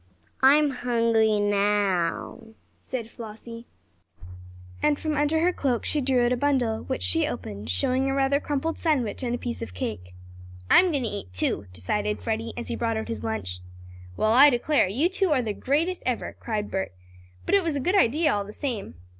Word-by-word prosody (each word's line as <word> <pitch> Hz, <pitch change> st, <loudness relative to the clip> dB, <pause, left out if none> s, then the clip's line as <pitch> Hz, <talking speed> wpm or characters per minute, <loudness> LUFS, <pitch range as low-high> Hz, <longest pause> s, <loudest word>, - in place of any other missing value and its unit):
"I'm 285 Hz, +2 st, +5 dB
hungry 230 Hz, -4 st, +2 dB
now," 205 Hz, +1 st, 0 dB, 0.2 s
said 235 Hz, -3 st, -6 dB
Flossie, 230 Hz, +1 st, -10 dB, 1.1 s
and 295 Hz, -1 st, +2 dB
from 310 Hz, -1 st, -2 dB
under 295 Hz, +2 st, +1 dB
her 360 Hz, +2 st, +2 dB
cloak 255 Hz, -7 st, -1 dB
she 300 Hz, -, 0 dB
drew 255 Hz, -2 st, +2 dB
out 240 Hz, -, +1 dB
a -, -, -1 dB
bundle, 245 Hz, -5 st, +1 dB
which 260 Hz, -, -3 dB
she 325 Hz, -2 st, +2 dB
opened, 105 Hz, -, -6 dB
showing 265 Hz, 0 st, +1 dB
a -, -, 0 dB
rather 275 Hz, +1 st, +2 dB
crumpled 295 Hz, +3 st, -2 dB
sandwich 275 Hz, -10 st, 0 dB
and 245 Hz, -2 st, -1 dB
a -, -, -3 dB
piece 240 Hz, -1 st, -5 dB
of 90 Hz, -5 st, -7 dB
cake. 90 Hz, -2 st, -5 dB, 0.6 s
"I'm 370 Hz, -, +7 dB
going 285 Hz, -6 st, -1 dB
to -, -, -1 dB
eat, 200 Hz, -, -6 dB
too," 95 Hz, +2 st, -1 dB
decided 205 Hz, -, -2 dB
Freddie, 225 Hz, 0 st, -3 dB
as 240 Hz, -, -6 dB
he -, -, -2 dB
brought 230 Hz, -1 st, -1 dB
out 220 Hz, -, -4 dB
his 110 Hz, -1 st, -4 dB
lunch. 100 Hz, -5 st, -3 dB, 0.6 s
"Well, 215 Hz, +1 st, +2 dB
I 275 Hz, +4 st, +8 dB
declare; 275 Hz, 0 st, +2 dB
you 255 Hz, -, +1 dB
two 385 Hz, 0 st, 0 dB
are 255 Hz, -3 st, +1 dB
the 215 Hz, -2 st, -2 dB
greatest 320 Hz, -, 0 dB
ever!" 250 Hz, -2 st, -2 dB
cried 210 Hz, -2 st, -3 dB
Bert. 190 Hz, -, -2 dB, 0.5 s
"But -, -, -1 dB
it 400 Hz, -1 st, +5 dB
was 325 Hz, -3 st, -1 dB
a -, -, 0 dB
good 355 Hz, +9 st, 0 dB
idea 310 Hz, -, +3 dB
all 205 Hz, -1 st, -1 dB
the 205 Hz, +1 st, -10 dB
same!" 230 Hz, -, -4 dB
240 Hz, 190 wpm, -25 LUFS, 210-285 Hz, 1.1 s, I